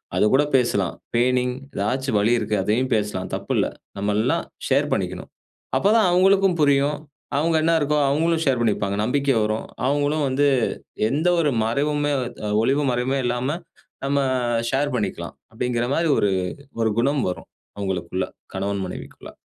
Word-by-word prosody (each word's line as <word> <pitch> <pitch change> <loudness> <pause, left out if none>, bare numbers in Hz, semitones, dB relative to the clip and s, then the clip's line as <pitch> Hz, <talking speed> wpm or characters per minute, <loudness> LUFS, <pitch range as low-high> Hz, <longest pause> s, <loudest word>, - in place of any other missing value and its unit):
அதுக்கூட 130 +7 +4
பேசலாம். 100 -8 +1 0.2
பெயினிங் 125 +1 +2 0.2
ஏதாச்சும் 125 +4 0
வழி 105 +3 +2
இருக்கு, 105 - -1
அதையும் 120 +6 0
பேசலாம். 105 -3 -2
தப்பில்ல. - - 0 0.3
நம்ம 100 +1 0
எல்லாம் 120 +4 +1 0.3
ஷேர் - - +3
பண்ணிக்கணும். - - -3 0.5
அப்பதான் 215 +1 +4
அவங்களுக்கும் 190 0 +4
புரியும். 145 0 +3 0.4
அவங்க 165 +3 +1
என்ன 165 +1 +3
இருக்கோ 150 0 +1
அவங்களும் 165 +3 +1
ஷேர் 130 -4 +2
பண்ணிப்பாங்க. 100 -3 0
நம்பிக்கை 140 +3 +1
வரும். 110 +1 -1 0.2
அவங்களும் 145 +2 +1
வந்து 135 +2 +2 0.7
எந்த 155 +6 +1
ஒரு 150 -3 +2
மறைவுமே 145 +5 0 0.3
த் - - -12
அ - - -2
ஒளிவு 140 +5 +2
மறைவுமே 125 +3 0
இல்லாம 125 +6 -1 0.5
நம்ம 140 +1 +1 0.5
ஷேர் 140 0 0
பண்ணிக்கலாம். 105 - -4 0.2
அப்டிங்கிற 120 +1 -1
மாரி 165 0 +1
ஒரு 100 - +2 0.5
ஒரு 110 -1 +2
குணம் 140 +3 +1
வரும். 90 - -7 0.3
அவங்களுக்குள்ள 95 -2 -2 0.3
கணவன் 100 0 -2
மனைவிக்குள்ள. 90 - -9
130 Hz, 140 wpm, -23 LUFS, 110-145 Hz, 0.7 s, அதுக்கூட